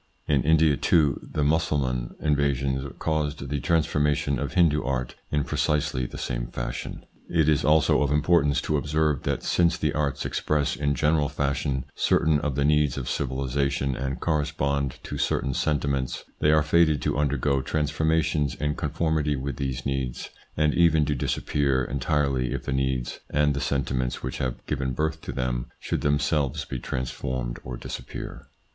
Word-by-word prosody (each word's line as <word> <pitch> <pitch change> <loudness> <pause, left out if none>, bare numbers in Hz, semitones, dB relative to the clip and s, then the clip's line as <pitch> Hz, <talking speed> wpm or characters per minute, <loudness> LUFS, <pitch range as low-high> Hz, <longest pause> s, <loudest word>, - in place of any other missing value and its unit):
In 70 -3 +3
India, 80 -1 +4
too, 75 -6 +3
the 75 - -3
Mussulman 70 -5 0
invasions 70 -2 0
caused 75 -3 -2
the 70 0 -1
transformation 75 -2 +1
of - - -3
Hindoo 80 -4 +4
art 65 -1 -2 0.2
in 75 -1 +1
precisely 75 -5 0
the - - -9
same - - -3
fashion. - - -5 0.2
It 80 -3 +2
is 75 -3 +3
also 75 -1 +4
of 70 - +2
importance 75 -1 +3
to 75 - 0
observe, 75 -1 +1
that - - -1
since 85 -1 +2
the 75 -2 0
arts 75 -2 -1
express 75 -3 0
in 70 +1 0
general 75 +1 +2
fashion 70 -1 -1
certain 80 -2 +2
of 75 -3 -2
the 70 0 +1
needs 75 -3 +3
of 65 - -4
civilisation 70 0 -1
and 65 0 -3
correspond 70 -3 0
to - - -5
certain 70 - 0
sentiments, 70 -3 -1 0.2
they 75 - +4
are 75 -1 +4
fated 80 -1 +3
to - - 0
undergo 70 -1 +1
transformations 75 0 0
in 75 0 -1
con 75 - -3
formity 75 -2 0
with 70 +1 -4
these 65 -2 -3
needs, 65 -3 -3 0.3
and 75 -1 +3
even 80 -3 +4
to 75 - 0
disappear 70 0 0
entirely 70 -1 0
if 70 - -4
the 70 - -2
needs 65 -2 -1
and 75 0 +2
the 70 - -2
sentiments 65 -2 -1
which 65 - -4
have 65 -2 -3
given 65 -1 -2
birth 80 +3 -1
to - - -5
them - - -2
should - - -2
themselves 70 -1 +1
be 65 - -5
transformed 65 -1 -3
or 65 -1 -6
disappear. - - -7
70 Hz, 165 wpm, -26 LUFS, 65-75 Hz, 0.3 s, India